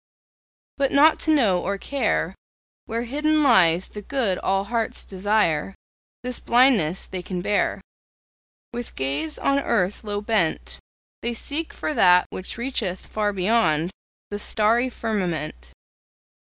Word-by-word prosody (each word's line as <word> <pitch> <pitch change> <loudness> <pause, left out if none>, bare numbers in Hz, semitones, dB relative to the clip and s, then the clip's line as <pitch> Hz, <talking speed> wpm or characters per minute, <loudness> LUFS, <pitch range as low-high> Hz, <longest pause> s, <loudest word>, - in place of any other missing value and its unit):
But 275 -1 +2
not 305 +3 +5
to 315 - +1
know 215 - +3
or 200 +1 -2
care 280 +7 -1 0.5
Where 230 +1 -2
hidden 300 +5 +1
lies 185 - +4
the 210 - -8
good 215 -5 -1
all 195 0 0
hearts 225 +2 -2
desire 195 -3 0 0.5
This 250 0 -4
blindness 235 - +3
they 185 - -6
can 180 0 -5
bear; 205 +1 0 0.9
With 240 0 -6
gaze 140 +4 -2
on 275 0 +1
earth 210 -7 0
low 205 -1 -3
bent, 205 -6 -1 0.4
They 235 0 -2
seek 305 +7 -2
for 310 - -4
that 180 -7 +5
which 185 - -7
reacheth 235 -7 -3
far 210 -1 -1
beyond 180 -5 +1 0.4
The 205 - -3
starry 230 +4 +2
firmament. 170 - -3
210 Hz, 130 wpm, -23 LUFS, 180-245 Hz, 0.9 s, not